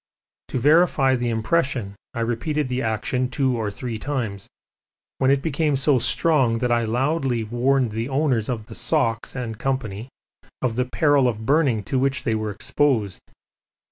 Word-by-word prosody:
To - - -3
verify 145 -1 +4
the 120 -1 -1
impression 115 -2 0 0.2
I 115 - -2
repeated 130 +5 -1
the 125 +1 -1
action 120 +3 -1
two 130 -1 0
or 110 -3 -2
three 115 +2 -5
times, 110 -8 -4 0.7
when 130 - +3
it 140 0 +2
became 155 -1 0
so 135 0 +2
strong 135 -5 +2
that 125 +1 -1
I 120 -1 +2
loudly 130 +1 0
warned 120 +2 +1
the 115 +4 -3
owners 135 -5 0
of 115 -4 -3
the - - -11
socks, 115 -8 0
&c., 120 -2 -3 0.5
of 120 -3 0
the 125 +1 0
peril 145 0 +3
of 110 -2 -3
burning 135 -6 +2
to 130 +7 -1
which 135 +1 0
they 115 - 0
were 110 -1 -2
exposed. 110 - 0
125 Hz, 160 wpm, -23 LUFS, 115-140 Hz, 0.7 s, verify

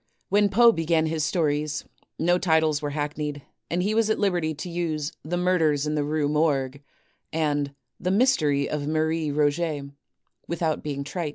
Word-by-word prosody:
When 205 +1 +4
Poe 235 +4 +6
began 165 -3 +1
his 160 -1 -1
stories, 150 -3 0 0.3
no 175 +2 +2
titles 160 -4 +2
were 145 - -2
hackneyed 145 -1 -3 0.3
and 175 +1 0
he 205 +3 0
was 225 0 +2
at 220 - +2
liberty 175 -6 0
to 155 - -6
use 165 -3 -2
"The 175 +3 -2
Murders 165 -5 +2
in 150 - -1
the 150 -1 0
Rue 150 0 0
Morgue" 145 -3 0 0.5
and 145 -3 -1 0.2
"The 180 - -1
Mystery 175 - +3
of 145 -1 -3
Marie 160 0 0
Roget" 145 0 0 0.6
without 165 -2 -1
being 140 -2 -4
trite. 165 +2 -3
155 Hz, 165 wpm, -25 LUFS, 145-175 Hz, 0.6 s, Poe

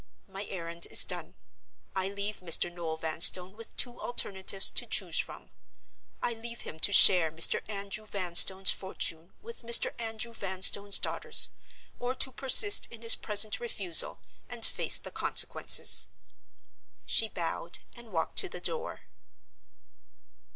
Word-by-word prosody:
My 195 +1 -9
errand 170 -3 -6
is - - +2
done. - - -6 0.6
I 190 0 -4
leave 200 +1 -7
Mr. 175 0 +1
Noel 165 -2 -7
Vanstone 180 +4 +2
with 225 0 -14
two 240 -1 0
alternatives 195 -4 0
to - - 0
choose - - -1
from. - - -8 0.7
I 240 - -3
leave 235 +1 -10
him 160 - -11
to 205 - +3
share 180 -5 +6
Mr. 160 +1 +3
Andrew 200 +1 -8
Vanstone's 190 0 +3
fortune 170 -3 -5
with 465 +1 -10
Mr. 235 -1 +3
Andrew 225 +1 -6
Vanstone's 200 0 +2
daughters—or 250 +1 -5
to 265 0 -3
persist 275 +11 +5
in 235 -1 -15
his 230 - +5
present 210 0 +1
refusal 200 -7 -1 0.3
and - - 0
face - - +4
the - - -8
consequences." - - +1 1.0
She 225 - 0
bowed, 170 -1 -7 0.2
and 235 -2 -16
walked 165 -3 -4
to 385 - -2
the - - -9
door. 475 +1 -6
200 Hz, 135 wpm, -27 LUFS, 180-230 Hz, 1.0 s, share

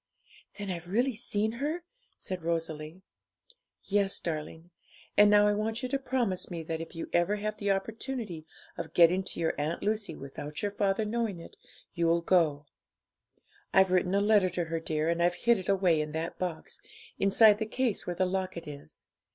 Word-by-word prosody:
'Then 200 -2 -4
I've 175 -1 -6
really 245 +8 +1
seen 215 -1 -1
her?' 310 +5 -2 0.3
said 185 -2 -5
Rosalie. 165 +1 -3 0.8
'Yes, 200 -1 +1
darling; 160 +1 -5 0.4
and 205 0 +7
now 205 0 +6
I 210 - +3
want 220 +4 -2
you 255 - -2
to 275 +1 0
promise 245 -8 -1
me 170 -2 -5
that, 160 0 -4
if 165 - -7 0.2
ever 175 +4 +3
you 205 - -7
have 215 0 -2
the 205 -1 -2
opportunity 205 - -3 0.3
of 165 -1 -6
getting 175 +2 +6
to - - -4
your 165 - +1
Aunt 155 +3 -2
Lucy 210 -5 -1
without 145 +4 -7
your 205 - 0
father 200 +1 0
knowing 220 -4 -2
it, 165 - -12 0.4
you'll 170 -1 +2
go. 160 -5 +2 1.1
I've 190 -1 +6
written 185 +1 +2
a 200 - +3
letter 205 -3 +4
to 175 0 -1
her, 165 0 -2
dear, 155 -1 -1
and 170 0 +1
I've 175 +1 +3
hid 235 -3 +5
it 185 - -6
away 185 -5 +3
in 150 0 -5
that 160 +1 -4
box, 175 -3 -4 0.4
inside 205 +2 +6
the 220 - -2
case 245 -1 -1
where 175 - -2
the 185 - +2
locket 185 -2 -3
is. 145 -1 -11
185 Hz, 185 wpm, -30 LUFS, 165-210 Hz, 1.1 s, and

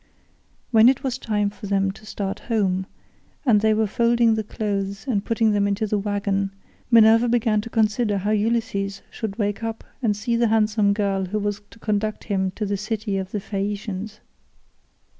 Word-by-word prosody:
When 225 +1 +7
it 265 - 0
was 260 -1 -2
time 210 -3 0
for 205 - -9
them 195 -1 +1
to 215 +2 -15
start 200 -1 -4
home, 190 -4 +1 0.6
and 215 -6 +4
they 220 0 +3
were 220 0 +2
folding 235 +2 +3
the 220 0 -1
clothes 200 -1 -3
and 215 -7 0
putting 225 -1 +2
them 205 -1 +2
into 200 +2 0
the 210 0 0
waggon, 200 -1 -1 0.4
Minerva 230 0 +6
began 225 -3 +2
to 230 - -8
consider 215 -1 +1
how 200 +2 -1
Ulysses 210 -2 -1
should 215 -4 -5
wake 205 -1 -1
up 225 -1 -4 0.2
and 210 -4 +1
see 235 +2 -1
the 235 0 +3
handsome 215 -1 +2
girl 200 -2 0
who 195 +4 -3
was 205 0 -2
to - - -16
conduct 215 -1 -2
him 190 -3 0
to 215 - -2
the 200 0 -1
city 210 -1 -2
of 190 -1 -5
the 205 - -3
Phaeacians. 205 +1 -4
210 Hz, 180 wpm, -23 LUFS, 200-225 Hz, 0.6 s, When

